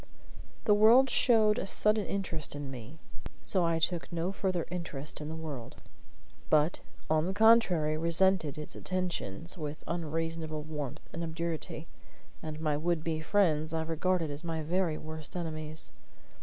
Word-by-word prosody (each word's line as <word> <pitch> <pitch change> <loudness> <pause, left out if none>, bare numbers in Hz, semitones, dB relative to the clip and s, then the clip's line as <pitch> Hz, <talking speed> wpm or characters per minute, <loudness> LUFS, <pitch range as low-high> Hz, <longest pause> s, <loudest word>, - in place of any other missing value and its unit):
The 210 - +4
world 230 +6 +6
showed 220 -3 +4
a - - -3
sudden 210 +1 +3
interest 165 -7 -1
in 145 -2 -5
me; 125 +4 -9 0.5
so 185 -3 +2
I 165 -1 +2
took 170 +2 -1
no 170 +2 -1
further 185 -3 -1
interest 155 -5 -4
in 150 - -5
the 160 - -5
world, 150 -7 -6 0.7
but, 155 +2 +3 0.3
on 155 +1 +2
the 190 - -1
contrary, 200 -9 +5
resented 170 -2 +2
its 150 - -6
attentions 175 - -1
with 150 0 -5
unreasonable 165 -1 -3
warmth 150 -4 -6
and 170 - -4
obduracy; 165 -1 -4 0.6
and 155 -1 -6
my 155 -2 0
would 165 +1 0
be 160 -1 -1
friends 160 -4 +2
I 160 0 0
regarded 165 0 0
as 145 +3 -6
my 165 -2 -3
very 170 0 0
worst 155 +1 -6
enemies. 155 -2 -1
165 Hz, 150 wpm, -31 LUFS, 155-180 Hz, 0.7 s, world